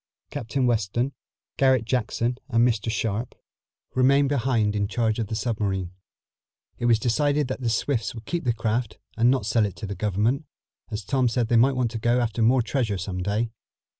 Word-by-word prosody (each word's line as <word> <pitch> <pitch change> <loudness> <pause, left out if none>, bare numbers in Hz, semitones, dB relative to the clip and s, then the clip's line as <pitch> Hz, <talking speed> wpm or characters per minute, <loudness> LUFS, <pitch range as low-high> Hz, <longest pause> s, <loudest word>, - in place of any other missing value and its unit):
Captain 125 +3 -1
Weston, 120 +3 0 0.4
Garret 130 -3 +3
Jackson 120 0 -1
and 115 -1 +4
Mr 115 -2 -1
Sharp 110 +2 -2 0.6
remained 135 +2 +4
behind 120 -6 +1
in 100 -1 0
charge 115 0 0
of 110 - -1
the 110 - -3
submarine. 100 -6 -2 0.9
It - - -2
was 115 -2 +5
decided 145 +5 +1
that 130 - -4
the 120 - 0
Swifts 115 +1 -1
would 115 -1 -9
keep 170 +5 -2
the 125 - +2
craft 115 0 -2 0.2
and 115 +2 +4
not 130 -5 +1
sell 110 +1 +2
it 100 -3 -2
to 90 - -6
the 100 - -4
Government, 110 +8 0 0.4
as 105 -3 -5
Tom 125 +3 +2
said 115 -1 0
they 120 - +3
might 130 +4 +5
want 125 -3 0
to 115 - -4
go 120 +3 +2
after 115 -1 -1
more 120 +2 +4
treasure 115 -5 -1
some 90 0 -4
day. 105 +4 -1
115 Hz, 190 wpm, -25 LUFS, 110-125 Hz, 0.9 s, was